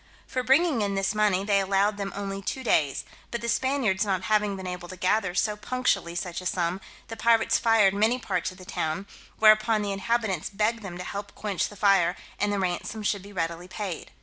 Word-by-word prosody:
For 255 - -2
bringing 270 +1 +3
in 200 -1 0
this 195 +1 0
money, 210 -3 +2
they 200 -1 +3
allowed 195 +2 +1
them 200 -1 -3
only 195 0 -4
two 260 +6 -4
days; 145 - +1 0.2
but 235 - -3
the 235 - -4
Spaniards 235 -5 +1
not 190 -3 -1
having 210 0 +1
been 190 -1 -7
able 180 -1 -5
to 185 - -8
gather 185 0 +1
so 210 +3 +1
punctually 210 -6 -1
such 175 0 -4
a 185 - -3
sum, 175 +1 -1 0.3
the 225 - -6
pirates 230 0 +3
fired 225 -4 +4
many 220 +5 +2
parts 185 -8 -2
of 185 - -14
the 185 - -12
town; 170 +2 -2 0.3
whereupon 215 0 +5
the 200 - -2
inhabitants 200 -3 -1
begged 215 +3 0
them 185 -4 -7
to 180 - -5
help 200 +2 -6
quench 205 -4 -2
the 205 - -12
fire, 195 -3 +3 0.2
and 205 0 +1
the 205 - 0
ransom 190 +3 -2
should 205 -1 0
be 200 +2 -12
readily 170 -1 -3
paid. 190 -2 -5
200 Hz, 210 wpm, -26 LUFS, 185-220 Hz, 0.3 s, whereupon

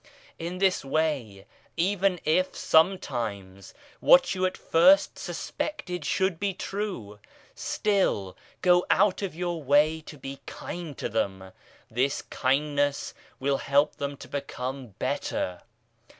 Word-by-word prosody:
In 170 +2 -4
this 190 0 +2
way, 135 -9 -1 0.3
even 190 +1 +1
if, 185 +4 +2
sometimes, 115 - 0 0.3
what 265 -3 +6
you 185 0 +1
at 185 - -6
first 280 - +4
suspected 180 - -4
should 190 -1 0
be 200 -2 -1
true, 185 - -5 0.3
still 190 - 0 0.3
go 180 -1 +5
out 200 0 +3
of 195 -5 -3
your 175 -1 -2
way 150 +3 +3
to 150 - -9
be 135 0 -8
kind 170 -6 -7
to - - -2
them 95 -3 -2 0.4
this 130 +5 0
kindness 145 +1 0 0.3
will 140 +1 +1
help 140 +2 +2
them 140 0 -4
to - - -11
become 135 -2 -5
better. 90 -1 -2
150 Hz, 120 wpm, -27 LUFS, 130-185 Hz, 0.4 s, what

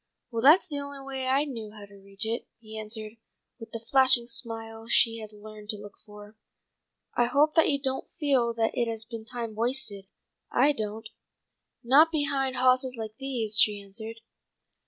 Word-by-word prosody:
"Well, 230 -1 -2
that's 305 +9 +6
the 290 -4 -3
only 280 0 -7
way 265 -1 -4
I 275 +3 +2
knew 225 -7 -7
how 210 -2 -11
to 200 - -19
reach 195 +2 -3
it," 230 +2 -3
he 220 -1 -11
answered, 215 0 -5 0.4
with 225 0 -10
the 230 0 -8
flashing 260 -3 +5
smile 225 -1 -4
she 230 -1 +3
had 215 -1 -9
learned 210 0 -12
to 215 - +4
look 205 0 -11
for. 210 +1 -13 0.8
"I 240 - +3
hope 290 +5 +3
that 325 - +4
you 280 - +1
don't 265 -1 -2
feel 265 -6 +2
that 225 -1 +1
it 235 - 0
has 225 -1 -4
been 225 -1 -8
time 235 -2 -5
wasted. 220 -4 -2 0.4
I 275 +4 +4
don't." 220 -4 -4 0.8
"Not 290 +7 +6
behind 280 -4 0
hawses 255 0 +2
like 220 -1 -6
these," 235 -6 0
she 210 -1 +4
answered. 220 +3 -8
230 Hz, 180 wpm, -27 LUFS, 215-265 Hz, 0.8 s, that's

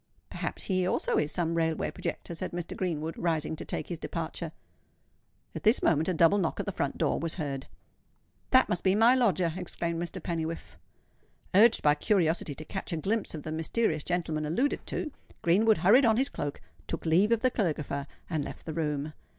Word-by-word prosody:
"Perhaps - - -4
he 185 -2 0
also - - +1
is 150 0 +1
some 170 0 0
railway 160 -1 0
projector," - - -5
said 165 - -5
Mr. 175 -1 -4
Greenwood, 165 -3 -2
rising 160 -2 0
to 160 - -7
take - - -4
his 170 -3 -4
departure. 165 -1 -4 1.0
At - - -5
this 220 +4 +3
moment 160 +2 +3
a - - +1
double 170 +5 +5
knock 170 - -1
at - - -2
the 200 - -2
front 140 -6 -2
door - - +1
was 165 -1 -2
heard. 140 -5 -4 0.8
"That 260 0 +5
must 175 - -1
be 190 0 +3
my 230 +4 +6
lodger," 185 -10 +2
exclaimed 170 -2 -3
Mr. 175 +2 -4
Pennywhiffe. 165 - -4 0.8
Urged 220 +4 +6
by 150 - +6
curiosity 160 -3 +1
to 155 - -9
catch 190 +3 -4
a 165 - -1
glimpse 200 +4 -1
of 150 - -7
the 155 - -5
mysterious 160 +1 0
gentleman 160 -4 -1
alluded 245 - 0
to, 305 - -3 0.3
Greenwood 210 +6 +4
hurried 240 +9 +6
on 225 -1 +4
his 270 +2 +2
cloak, 145 0 -4 0.3
took - - -4
leave 180 +7 +4
of 230 -1 +3
the 255 - +3
caligrapher, 150 - -2 0.2
and 160 -4 -1
left - - -8
the 160 - -4
room. 150 -1 -2
170 Hz, 190 wpm, -29 LUFS, 155-200 Hz, 1.0 s, my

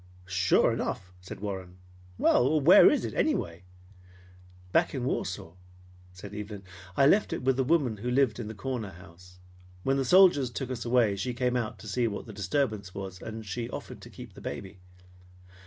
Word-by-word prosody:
"Sure 90 -1 +3
enough!" 90 -1 -4
said 95 - -9
Warren. 95 -3 -6 0.4
"Well, 145 +5 +3
where 155 +6 +8
is 295 - 0
it, - - -5
anyway?" 90 - -1 1.1
"Back - - +2
in - - -2
Warsaw," 80 - -3 0.6
said 90 +2 -11
Evelyn. 105 -1 -7 0.3
"I 135 - +5
left 200 +9 +4
it - - -4
with 130 0 +2
the 130 - +1
woman 135 -6 +1
who 120 +5 -4
lived 125 -3 +2
in 115 - -5
the 110 - -7
corner 110 0 -4
house. 90 0 -16 0.5
When 135 +1 +1
the 135 - +1
soldiers 175 -4 +5
took 130 +1 -5
us 120 -2 -4
away, 120 -5 +2
she 125 +4 -3
came 125 0 0
out 115 -3 -2
to 110 - -11
see 120 +3 0
what 100 - -5
the 110 - -10
disturbance 100 -1 -2
was, 95 -2 -7
and 110 -1 -7
she 115 +4 -4
offered - - -8
to - - -11
keep - - -11
the - - -13
baby." 95 0 -7
110 Hz, 185 wpm, -28 LUFS, 95-130 Hz, 1.1 s, where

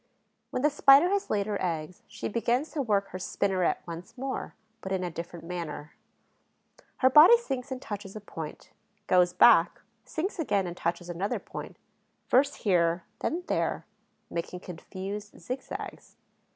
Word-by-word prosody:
When 255 - -3
the 300 - +4
Spider 280 +3 +7
has 400 0 0
laid 205 -2 +1
her 205 -1 -2
eggs, 165 -1 -3
she - - -5
begins 240 +6 0
to 305 - -1
work 205 -5 +1
her 185 - -6
spinneret 190 -1 0
once 170 +7 -8
more, 265 +1 -4 0.3
but 190 - -6
in 190 -1 0
a 175 - -3
different 170 0 -7
manner. 165 -4 -6 1.0
Her 260 - +5
body 315 - +9
sinks 270 - -4
and 260 - -3
touches 205 -4 -7
a - - -5
point, 165 -6 -8 0.3
goes 180 -2 +4
back, 180 -3 +5 0.2
sinks 360 +4 -4
again 205 - +1
and 175 -1 -5
touches 175 0 -2
another 175 +3 -2
point, - - -8 0.5
first 280 +3 +3
here, 170 -3 +3 0.2
then 345 +3 -2
there, - - -1 0.5
making 170 +1 -4
confused 195 +4 -7
zigzags. 255 +2 -7
200 Hz, 150 wpm, -28 LUFS, 175-260 Hz, 1.0 s, body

